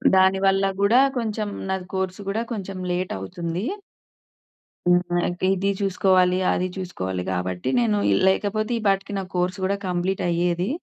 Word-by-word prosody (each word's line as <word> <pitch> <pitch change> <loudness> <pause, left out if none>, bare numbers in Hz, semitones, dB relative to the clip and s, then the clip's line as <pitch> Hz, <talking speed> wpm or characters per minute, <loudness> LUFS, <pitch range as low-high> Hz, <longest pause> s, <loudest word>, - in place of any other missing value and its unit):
దానివల్ల 195 +1 +4 0.2
గూడా 225 +6 +5 0.2
కొంచెం 215 -2 -2 0.2
నాది 190 -1 -2
కోర్సు 190 +1 -2
గూడా 220 +3 -1
కొంచెం 195 -3 -5
లేట్ 180 +1 -1
అవుతుంది. 170 - -4 1.2
హ్మ్. 175 0 +3
ఇంకా 175 +1 -4
ఇది 195 +1 0
చూసుకోవాలి, 185 -2 +3
అది 185 - 0
చూసుకోవాలి, 95 - -4
గాబట్టి 90 +3 -2
నేను 110 -3 +2
ఈ - - +3 0.2
లేకపోతే 215 +3 0
ఈపాటికి 200 -1 0
నా - - -2
కోర్స్ 180 +2 0
గూడా 195 +1 +1
కంప్లీట్ 180 +2 -1
అయ్యేది. 175 +2 0
185 Hz, 140 wpm, -23 LUFS, 175-195 Hz, 1.2 s, గూడా